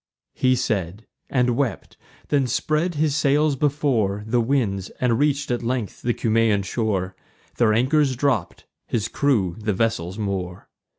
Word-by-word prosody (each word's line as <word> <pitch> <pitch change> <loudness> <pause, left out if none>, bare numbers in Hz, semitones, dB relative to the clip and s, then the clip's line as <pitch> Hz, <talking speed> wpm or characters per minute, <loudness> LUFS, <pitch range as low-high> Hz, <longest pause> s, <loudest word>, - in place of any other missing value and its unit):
He 130 0 +2
said, 105 -5 -2 0.2
and 125 -2 +2
wept; 125 -6 -2 0.3
then 140 -3 +2
spread 155 +7 0
his 150 -1 +1
sails 150 0 +2
before 130 -8 0
The 120 +2 +1
winds, 115 -7 0
and 120 -2 +1
reach'd 145 -2 +1
at 120 - -1
length 120 -3 -3
the 120 -1 0
Cumaean 110 -3 +2
shore: 95 -2 -2 0.4
Their 115 -3 +4
anchors 135 +3 +2
dropp'd, 125 -10 -1 0.2
his 110 -3 -1
crew 110 -12 +1
the 105 -1 -1
vessels 95 -3 -1
moor. 95 -4 -4
120 Hz, 140 wpm, -23 LUFS, 105-140 Hz, 0.4 s, Their